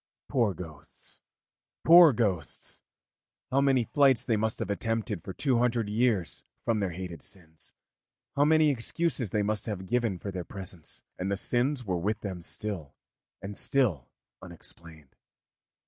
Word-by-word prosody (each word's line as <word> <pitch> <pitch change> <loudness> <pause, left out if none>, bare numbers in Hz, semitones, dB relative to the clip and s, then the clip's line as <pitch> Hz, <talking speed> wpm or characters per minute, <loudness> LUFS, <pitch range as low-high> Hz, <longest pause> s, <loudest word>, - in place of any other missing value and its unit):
Poor 115 -7 +2
ghosts, 80 -4 -9 0.6
poor 170 -1 +10
ghosts! 100 - -2 0.7
how 135 +2 +3
many 135 -3 +4
flights 135 0 +3
they 115 - +2
must 110 +1 0
have - - -2
attempted 110 -3 -2
for - - -6
two 125 +4 +1
hundred 120 -2 +1
years 105 - +1 0.2
from 115 -2 +2
their 100 -2 0
hated 90 -1 -6
sins, 80 -4 -9 0.6
how 140 - +4
many 155 0 +5
excuses 135 - -1
they 105 +3 +1
must 105 +1 -1
have 100 -3 -4
given 115 -2 0
for 100 +3 -5
their 90 -2 -4
presence, 90 -3 -8 0.2
and 95 +2 -1
the 100 - 0
sins 125 +4 0
were 90 -3 -1
with 105 +5 -1
them 95 -4 -5
still 85 -5 -5 0.5
and 100 +1 -5
still 105 - +1 0.3
unexplained. 80 -5 -11
105 Hz, 145 wpm, -29 LUFS, 90-125 Hz, 0.7 s, poor